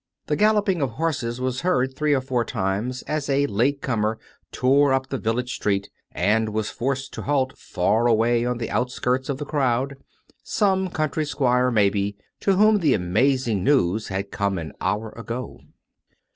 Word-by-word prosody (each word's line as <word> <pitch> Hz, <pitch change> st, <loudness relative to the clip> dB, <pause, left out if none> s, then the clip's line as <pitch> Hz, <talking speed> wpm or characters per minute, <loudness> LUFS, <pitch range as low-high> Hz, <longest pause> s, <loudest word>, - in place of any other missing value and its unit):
The 150 Hz, -, 0 dB
galloping 210 Hz, -3 st, +2 dB
of 130 Hz, -5 st, -1 dB
horses 125 Hz, -5 st, -2 dB
was 130 Hz, 0 st, -2 dB
heard 130 Hz, -7 st, +1 dB
three 150 Hz, 0 st, +2 dB
or 130 Hz, -, 0 dB
four 130 Hz, -2 st, 0 dB
times 105 Hz, +6 st, -2 dB
as 150 Hz, -1 st, -3 dB
a 140 Hz, +1 st, +3 dB
late 140 Hz, +5 st, 0 dB
comer 110 Hz, -3 st, 0 dB, 0.3 s
tore 135 Hz, +2 st, +3 dB
up 130 Hz, 0 st, 0 dB
the 135 Hz, -, -3 dB
village 125 Hz, +3 st, -1 dB
street 100 Hz, -1 st, -1 dB, 0.2 s
and 110 Hz, +1 st, +1 dB
was 110 Hz, 0 st, -2 dB
forced 135 Hz, +3 st, -3 dB
to -, -, -5 dB
halt 135 Hz, -2 st, 0 dB
far 110 Hz, +6 st, 0 dB
away 115 Hz, +1 st, +3 dB
on 125 Hz, 0 st, -1 dB
the 115 Hz, -, -4 dB
out 125 Hz, 0 st, 0 dB
skirts 125 Hz, +1 st, -1 dB
of 140 Hz, -, -1 dB
the 145 Hz, -, -5 dB
crowd 135 Hz, -2 st, 0 dB, 0.2 s
— -, -, -35 dB
some 190 Hz, -3 st, +1 dB
country 155 Hz, -1 st, -1 dB
squire, 125 Hz, -4 st, +1 dB
maybe, 100 Hz, -2 st, +1 dB, 0.2 s
to 195 Hz, -, +2 dB
whom 215 Hz, +2 st, +5 dB
the 155 Hz, -7 st, +3 dB
amazing 110 Hz, +3 st, +1 dB
news 110 Hz, -5 st, +2 dB
had 100 Hz, +1 st, -4 dB
come 100 Hz, -1 st, -1 dB
an 80 Hz, -4 st, -6 dB
hour 105 Hz, +3 st, -1 dB
ago. 115 Hz, +1 st, -6 dB
125 Hz, 175 wpm, -23 LUFS, 110-140 Hz, 0.3 s, whom